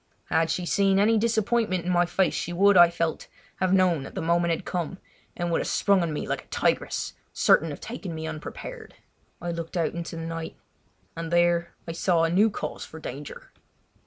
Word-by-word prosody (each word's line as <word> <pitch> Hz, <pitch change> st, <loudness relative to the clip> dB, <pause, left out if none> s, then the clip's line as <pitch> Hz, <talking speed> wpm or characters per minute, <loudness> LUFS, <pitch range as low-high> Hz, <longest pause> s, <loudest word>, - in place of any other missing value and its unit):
Had 160 Hz, 0 st, +2 dB
she 175 Hz, +2 st, -1 dB
seen 195 Hz, +1 st, +3 dB
any 215 Hz, +3 st, +4 dB
disappointment 220 Hz, -4 st, +1 dB
in 180 Hz, -, 0 dB
my 175 Hz, 0 st, +3 dB
face 190 Hz, +1 st, +1 dB
she -, -, -3 dB
would, 200 Hz, +3 st, +4 dB
I 175 Hz, -1 st, +8 dB
felt, 170 Hz, -2 st, -2 dB, 0.3 s
have 185 Hz, -1 st, +1 dB
known 185 Hz, -5 st, +3 dB
that 135 Hz, -, -9 dB
the 190 Hz, -, -2 dB
moment 170 Hz, +1 st, +2 dB
had 165 Hz, -, -1 dB
come, 180 Hz, +1 st, -3 dB, 0.4 s
and 175 Hz, -1 st, -1 dB
would 165 Hz, -, +1 dB
have -, -, -3 dB
sprung 200 Hz, -2 st, +3 dB
on 170 Hz, -2 st, -1 dB
me 150 Hz, -, -4 dB
like -, -, -2 dB
a -, -, -29 dB
tigress, -, -, -1 dB, 0.2 s
certain 160 Hz, 0 st, +4 dB
of 145 Hz, -, -7 dB
taking 200 Hz, -8 st, -6 dB
me 160 Hz, 0 st, -5 dB
unprepared. 300 Hz, -, -7 dB, 0.4 s
I 175 Hz, -, -3 dB
looked 170 Hz, +1 st, -5 dB
out 165 Hz, -2 st, 0 dB
into 170 Hz, 0 st, -5 dB
the 165 Hz, -, -5 dB
night, 165 Hz, 0 st, -5 dB, 0.6 s
and 165 Hz, 0 st, -5 dB
there 170 Hz, 0 st, +2 dB
I -, -, -3 dB
saw 165 Hz, 0 st, +2 dB
new 190 Hz, +7 st, +4 dB
cause -, -, -5 dB
for 160 Hz, -, -10 dB
danger. 145 Hz, -1 st, -8 dB
175 Hz, 200 wpm, -26 LUFS, 165-190 Hz, 0.6 s, I